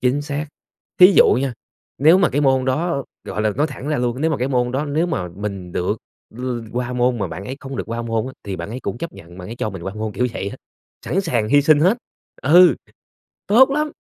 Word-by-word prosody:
Chính 130 +3 +1
xác. 145 +1 -4 0.5
Thí 185 +2 +9
dụ - - +7
nha, 135 +1 -1 0.5
nếu 160 +7 +6
mà 180 - +4
cái 140 +2 0
môn 130 -2 +3
đó, 140 +2 -1 0.2
gọi 105 - -3
là, 110 - +2
nói 150 - +2
thẳng 145 -1 -7
ra 150 - +1
luôn, 125 +2 -1
nếu 160 +1 +2
mà 150 - 0
cái 130 +2 -1
môn 125 -2 0
đó 140 +3 -1
nếu 155 +4 0
mà 95 - -2
mình 95 -1 -6
được 95 +5 -1 0.3
l 125 +3 -8 0.3
qua 125 +1 -2
môn 125 -1 +1
mà 100 - -1
bạn 90 +4 -7
ấy 130 +5 -6
không 135 0 -7
được - - -3
qua 115 +1 -4
môn 115 0 -1
á 130 - -7
thì 95 -2 -4
bạn 85 +3 -6
ấy 125 +2 -5
cũng 120 - -4
chấp 170 - -5
nhận 85 +2 -13
bạn 90 +1 -8
ấy 115 - -7
cho 110 - -2
mình 95 -3 -8
qua 95 +3 -5
môn, 110 -1 -4
kiểu, 125 - 0
vậy 100 - -3
á, - - -8 0.5
sẵn 195 - +1
sàng 120 - -1
hy 145 +1 +5
sinh 150 0 +5
hết. 195 +9 +3 0.4
Ừ, 170 0 +7 0.7
tốt 255 +7 +6
lắm! 300 +2 -1
130 Hz, 250 wpm, -20 LUFS, 110-150 Hz, 0.7 s, Thí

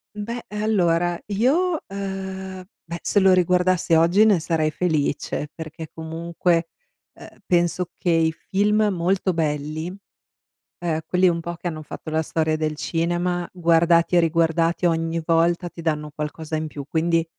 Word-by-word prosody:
Beh 230 +3 -5
allora 175 -5 +1
io, 300 - +2
ehm, 190 -1 -5 0.2
beh 170 +1 -6
se - - +1
lo 190 -1 +5
riguardassi 180 -1 +3
oggi 170 +6 +5
ne 200 -6 +4
sarei 155 -1 0
felice, 150 -3 -1
perché 160 0 -8
comunque, 165 +1 -1 0.5
ehm, - - -14
penso 175 0 +1
che 175 - -1
i 165 -1 +3
film 210 +6 +1
molto 185 +2 0
belli, 155 0 -2 0.9
ehm, 165 -2 -1
quelli 180 0 +3
un 170 -1 -1
po' 170 +1 -5
che 170 - -6
hanno 155 -2 -7
fatto 155 - -8
la 160 +1 +1
storia 155 0 0
del 155 -1 -1
cinema, 175 +2 -1
guardati 170 0 +3
e - - +7
riguardati 165 +1 +2
ogni 165 0 0
volta 170 +2 +2
ti 170 - -10
danno 150 -2 -2
qualcosa 155 +1 -4
in 155 0 -3
più 145 -2 -8
quindi 165 +2 +1
170 Hz, 150 wpm, -23 LUFS, 160-185 Hz, 0.9 s, e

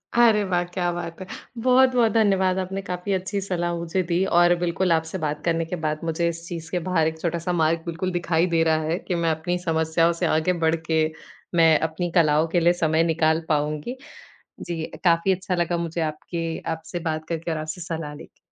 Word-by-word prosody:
अरे 225 -3 +5
वाह! 180 -2 0
क्या 175 0 -2
बात 170 -1 -6
है। - - -5 0.4
बहुत-बहुत 255 -3 +4
धन्यवाद 195 -4 +2
आपने 190 +1 -3
काफ़ी 180 +2 -2
अच्छी 190 +2 -2
सलाह 175 -3 -2
मुझे 170 +2 -1
दी 175 +3 +2
और 175 -1 +4
बिल्कुल, 175 +1 0
आपसे 160 +2 0
बात 150 -3 -3
करने 165 -1 +1
के 170 - -4
बाद 155 0 -1
मुझे 165 +1 0
इस 170 0 -7
चीज़ 165 -2 -6
के 180 - 0
बाहर 160 -4 +2
एक 160 0 -4
छोटा-सा 170 +1 -1
मार्ग 165 -1 +2
बिल्कुल 170 +2 -3
दिखाई 170 -1 +1
दे 165 -2 +2
रहा 160 -1 +2
है 160 +2 -1
कि, 180 - -3
मैं 170 -1 +1
अपनी 160 +3 -1
समस्याओं 165 +1 +2
से - - +3
आगे 160 +4 +2
बढ़ 160 0 +3
के, 160 -1 0 0.5
मैं 165 -2 +6
अपनी 170 +2 -3
कलाओं 155 -2 +4
के 175 +2 +1
लिए 175 +1 +4
समय 160 +1 +3
निकाल 160 -1 +2
पाऊँगी। 150 - -1 0.6
जी, 165 -2 -4 0.2
काफ़ी 170 +2 +4
अच्छा 185 0 -2
लगा 175 0 0
मुझे 170 0 -3
आपकी 160 +1 -3 0.2
आपसे 160 +2 -7
बात 155 0 -3
करके 165 0 -3
और 160 - -2
आपसे 155 +3 -5
सलाह 165 -3 -5
लेके। - - -14
170 Hz, 200 wpm, -24 LUFS, 160-180 Hz, 0.6 s, मैं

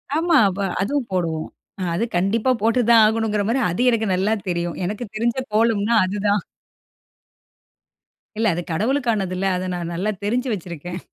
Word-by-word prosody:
ஆமா. 330 -1 +3 0.2
வ - - -5 0.2
அதுவும் 260 +4 -1
போடுவோம். 165 -4 -1 0.3
அ - - -4
அது 225 - 0
கண்டிப்பா 215 +7 +1
போட்டு 230 +3 +2
தான் 230 -1 +7
ஆகணுங்கிறமாரி 220 +1 +1
அது 180 - -2
எனக்கு 225 -2 +1
நல்லா 195 +4 +1 0.2
தெரியும். 170 -1 -2
எனக்கு 210 +5 -3
தெரிஞ்ச 235 +3 0 0.2
கோலம்னா 225 0 +2
அதுதான். 205 +1 0 2.0
இல்ல. 225 0 +1
அது 175 - -2
கடவுளுக்கானது 215 - 0
இல்ல. 195 - -1
அதை 185 +1 -3
நான் 175 -1 -4
நல்லா 190 +5 -1
தெரிஞ்சு 245 +5 0
வச்சிருக்கேன். 175 -1 -6
210 Hz, 145 wpm, -21 LUFS, 185-230 Hz, 2.0 s, தான்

